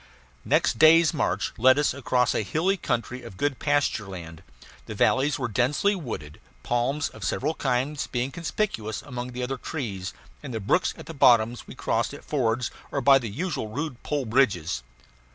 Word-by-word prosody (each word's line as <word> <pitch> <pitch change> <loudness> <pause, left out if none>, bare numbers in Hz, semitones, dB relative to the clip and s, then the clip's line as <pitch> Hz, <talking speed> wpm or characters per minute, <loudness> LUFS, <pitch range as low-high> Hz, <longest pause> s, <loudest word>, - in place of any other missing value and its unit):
Next - - +2
day's 160 +2 +7
march 150 - -1
led 130 +3 +6
us 145 - +2
across 125 -2 +1
a - - +1
hilly 160 - +1
country 125 - -2
of 115 -6 -11
good 145 +3 -1
pastureland. 95 - -1 0.5
The - - -6
valleys 140 +3 +2
were 130 -3 -2
densely 130 - +1
wooded, 110 - -7 0.2
palms 125 +5 0
of - - -11
several 150 +4 0
kinds 135 +1 -1
being 125 +2 -2
conspicuous 165 - -3
among 125 -2 -6
the 125 0 -4
other 135 +2 -2
trees; 105 - -4 0.3
and 130 -5 -6
the - - -1
brooks 110 - +1
at - - -10
the 165 - -8
bottoms 120 -4 +4
we - - -10
crossed 115 +2 -1
at - - -13
fords 125 -4 0 0.2
or 140 - 0
by 135 +1 +6
the 120 -4 -5
usual 150 - -3
rude 135 +3 -5
pole 145 -3 -2
bridges. 100 - +1
130 Hz, 170 wpm, -26 LUFS, 115-145 Hz, 0.5 s, day's